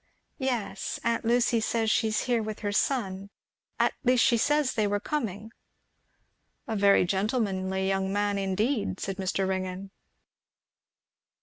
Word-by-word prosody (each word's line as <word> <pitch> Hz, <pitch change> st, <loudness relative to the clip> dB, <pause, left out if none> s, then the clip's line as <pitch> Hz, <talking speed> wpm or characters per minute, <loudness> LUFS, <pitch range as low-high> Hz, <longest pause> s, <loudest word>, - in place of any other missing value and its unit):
"Yes, 240 Hz, -7 st, -2 dB
aunt 230 Hz, 0 st, 0 dB
Lucy 235 Hz, 0 st, +3 dB
says 225 Hz, 0 st, 0 dB
she 225 Hz, -, +2 dB
is 215 Hz, -, 0 dB
here 240 Hz, -3 st, +1 dB
with 215 Hz, -1 st, -5 dB
her 205 Hz, -2 st, -1 dB
son, 200 Hz, -4 st, -1 dB, 0.5 s
at -, -, +3 dB
least 250 Hz, -2 st, +4 dB
she 235 Hz, -, +4 dB
says 290 Hz, +3 st, +2 dB
they 215 Hz, -2 st, +1 dB
were 205 Hz, 0 st, 0 dB
coming." 220 Hz, -5 st, -4 dB, 1.2 s
"A 225 Hz, -, -2 dB
very 200 Hz, -2 st, +4 dB
gentlemanly 190 Hz, -1 st, -1 dB
young 195 Hz, 0 st, 0 dB
man, 205 Hz, 0 st, 0 dB
indeed," 200 Hz, +2 st, -1 dB
said 195 Hz, -1 st, -4 dB
Mr. 190 Hz, 0 st, -1 dB
Ringgan. 190 Hz, 0 st, -3 dB
205 Hz, 135 wpm, -28 LUFS, 195-235 Hz, 1.2 s, least